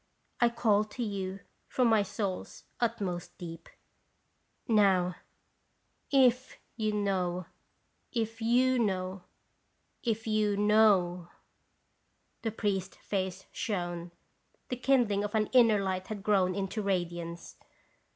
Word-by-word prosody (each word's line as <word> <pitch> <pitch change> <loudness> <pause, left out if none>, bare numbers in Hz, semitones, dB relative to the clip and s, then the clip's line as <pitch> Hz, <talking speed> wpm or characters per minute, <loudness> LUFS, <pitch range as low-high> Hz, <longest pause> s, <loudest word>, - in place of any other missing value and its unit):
I 240 - +5
call 220 -3 +2
to 225 +3 -5
you 195 -2 -4 0.3
from 250 -2 +2
my 220 -2 +4
soul's 200 -1 -4 0.2
utmost 205 -7 -2
deep, 165 -2 -9 1.0
Now 190 -5 +3 0.9
if 260 -2 +3 0.2
you 215 -2 0
know, 185 -4 -1 0.7
if 225 -1 -2
you 250 +3 +3
know, 185 -3 -1 0.8
if 225 -2 -1
you 215 -2 +1
knowf 200 -5 +3 1.1
The 225 - -1
priest's 195 -3 -2
face 190 -1 -3
shone; 175 -4 -3 0.6
the 250 - -1
kindling 245 -6 +2
of 205 +1 -3
an 215 -1 +1
inner 230 -4 +6
light 190 -1 -2
had 210 -3 -6
grown 190 -4 +2
into 200 +2 -2
radiance. 175 -3 -3
205 Hz, 110 wpm, -30 LUFS, 185-225 Hz, 1.1 s, inner